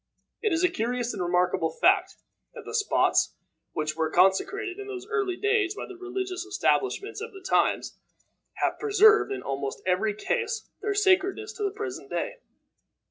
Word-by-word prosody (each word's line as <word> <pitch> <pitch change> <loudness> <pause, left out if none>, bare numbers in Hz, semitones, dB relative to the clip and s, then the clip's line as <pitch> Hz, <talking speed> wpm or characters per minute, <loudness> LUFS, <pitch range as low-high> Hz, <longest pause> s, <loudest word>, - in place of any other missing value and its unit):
It 430 - +1
is 330 +1 +1
a - - +6
curious 245 -3 -2
and - - -4
remarkable 180 -2 +1
fact, 375 - +2 0.4
that - - -9
the - - -7
spots 425 -2 +2 0.4
which 155 0 -2
were 160 -1 0
consecrated 370 - +2
in 405 - -7
those 385 -2 -6
early 415 -4 -1
days 410 -2 +1
by - - -5
the 380 - -10
religious 370 0 -4
establishments 400 +2 0
of 460 0 -6
the 390 - -10
times, - - +1 0.6
have - - -1
preserved 430 0 +5
in 400 - -4
almost 135 0 -4
every 200 +3 +1
case 455 - -2
their 410 0 -1
sacredness 395 +2 +2
to 430 - -5
the 400 - +2
present 395 -2 -6
day. - - -3
385 Hz, 165 wpm, -27 LUFS, -, 0.6 s, a